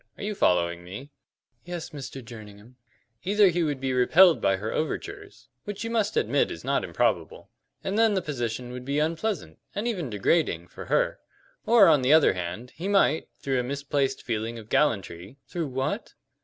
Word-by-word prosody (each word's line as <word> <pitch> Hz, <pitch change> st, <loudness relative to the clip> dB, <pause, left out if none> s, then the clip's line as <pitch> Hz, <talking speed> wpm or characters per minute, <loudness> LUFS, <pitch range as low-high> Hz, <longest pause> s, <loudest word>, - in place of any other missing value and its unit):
Are -, -, -8 dB
you 210 Hz, +1 st, -2 dB
following 85 Hz, -, +1 dB
me?" 115 Hz, +11 st, -9 dB, 0.5 s
"Yes, 175 Hz, -1 st, -6 dB
Mr. 135 Hz, -3 st, -8 dB
Jerningham." 110 Hz, 0 st, -12 dB, 0.5 s
"Either 200 Hz, +1 st, +4 dB
he 175 Hz, 0 st, 0 dB
would 145 Hz, -4 st, -1 dB
be 130 Hz, -1 st, -1 dB
repelled 165 Hz, +8 st, +5 dB
by 95 Hz, -, +3 dB
her 105 Hz, +3 st, -4 dB
overtures, 405 Hz, -, -5 dB, 0.2 s
which 205 Hz, 0 st, -5 dB
you 230 Hz, -, -4 dB
must 215 Hz, -3 st, 0 dB
admit -, -, +2 dB
is -, -, -7 dB
not -, -, 0 dB
improbable, -, -, -1 dB, 0.3 s
and 200 Hz, +3 st, -1 dB
then 225 Hz, -2 st, +4 dB
the 190 Hz, -, +1 dB
position 120 Hz, -4 st, -4 dB
would 125 Hz, 0 st, -7 dB
be 140 Hz, +3 st, -2 dB
unpleasant, 160 Hz, -, -2 dB, 0.2 s
and 210 Hz, +4 st, -2 dB
even 180 Hz, -, -2 dB
degrading, 100 Hz, -, 0 dB
for -, -, -9 dB
her; -, -, +1 dB, 0.5 s
or, 225 Hz, -4 st, +7 dB
on 150 Hz, -4 st, +5 dB
the 130 Hz, +4 st, +4 dB
other 160 Hz, -9 st, +6 dB
hand, 90 Hz, +7 st, -5 dB
he 175 Hz, +5 st, -6 dB
might, 195 Hz, -6 st, +3 dB
through 135 Hz, -2 st, 0 dB
a -, -, 0 dB
misplaced 140 Hz, 0 st, -2 dB
feeling 115 Hz, 0 st, -3 dB
of 110 Hz, -1 st, -11 dB
gallantry 100 Hz, -, 0 dB
" -, -, -52 dB
"Through 170 Hz, -3 st, -3 dB
what?" 130 Hz, 0 st, -3 dB
140 Hz, 185 wpm, -26 LUFS, 115-180 Hz, 0.5 s, or